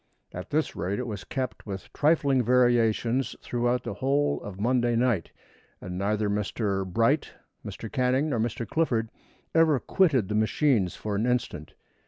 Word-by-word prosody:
At 90 Hz, -, -7 dB
this 155 Hz, +1 st, 0 dB
rate 95 Hz, +3 st, -2 dB
it 125 Hz, -, -3 dB
was 105 Hz, -5 st, -5 dB
kept 130 Hz, -5 st, -5 dB
with 95 Hz, -1 st, -7 dB
trifling 145 Hz, -4 st, +3 dB
variations 120 Hz, 0 st, +2 dB
throughout 120 Hz, +1 st, -1 dB
the -, -, -4 dB
whole 140 Hz, +2 st, 0 dB
of 100 Hz, -2 st, -8 dB
Monday 120 Hz, +1 st, +1 dB
night, 115 Hz, -7 st, +1 dB, 0.5 s
and 90 Hz, 0 st, -7 dB
neither 105 Hz, +3 st, 0 dB
Mr. 100 Hz, -1 st, -1 dB
Bright, 115 Hz, -, +1 dB, 0.3 s
Mr. 115 Hz, -, -7 dB
Canning, 130 Hz, +2 st, +1 dB
nor 115 Hz, -, 0 dB
Mr. 115 Hz, +1 st, -2 dB
Clifford 115 Hz, -6 st, 0 dB, 0.4 s
ever 160 Hz, -4 st, +4 dB
quitted 145 Hz, -, +2 dB
the 105 Hz, -, -3 dB
machines 110 Hz, -, +2 dB
for 105 Hz, -1 st, -4 dB
an 110 Hz, +4 st, 0 dB
instant. 125 Hz, -11 st, -2 dB
120 Hz, 155 wpm, -27 LUFS, 105-130 Hz, 0.5 s, ever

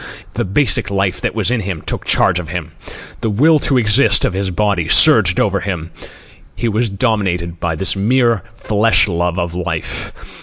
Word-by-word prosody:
The -, -, -2 dB
basic 100 Hz, -1 st, 0 dB
life 95 Hz, -2 st, -1 dB
that -, -, -3 dB
was 110 Hz, 0 st, 0 dB
in 125 Hz, -, 0 dB
him 95 Hz, -6 st, -5 dB
took -, -, -4 dB
charge 90 Hz, -, +2 dB
of 80 Hz, -3 st, -8 dB
him. 80 Hz, -1 st, -5 dB, 0.5 s
The 110 Hz, -, -2 dB
will 150 Hz, +9 st, +3 dB
to 135 Hz, -, 0 dB
exist 115 Hz, +3 st, +3 dB
of -, -, -2 dB
his 95 Hz, 0 st, -2 dB
body 95 Hz, -3 st, -1 dB
surged 105 Hz, -, +6 dB
over 100 Hz, -1 st, +1 dB
him. 85 Hz, -5 st, -5 dB, 0.6 s
He 120 Hz, -, -3 dB
was 115 Hz, +1 st, 0 dB
dominated 95 Hz, -6 st, -2 dB
by 80 Hz, -1 st, -2 dB
this 85 Hz, +3 st, -1 dB
mere 115 Hz, +2 st, +1 dB
flesh 110 Hz, -2 st, +2 dB
love 85 Hz, -1 st, -2 dB
of 85 Hz, -1 st, -3 dB
life. 90 Hz, 0 st, -4 dB
100 Hz, 180 wpm, -16 LUFS, 90-110 Hz, 0.6 s, surged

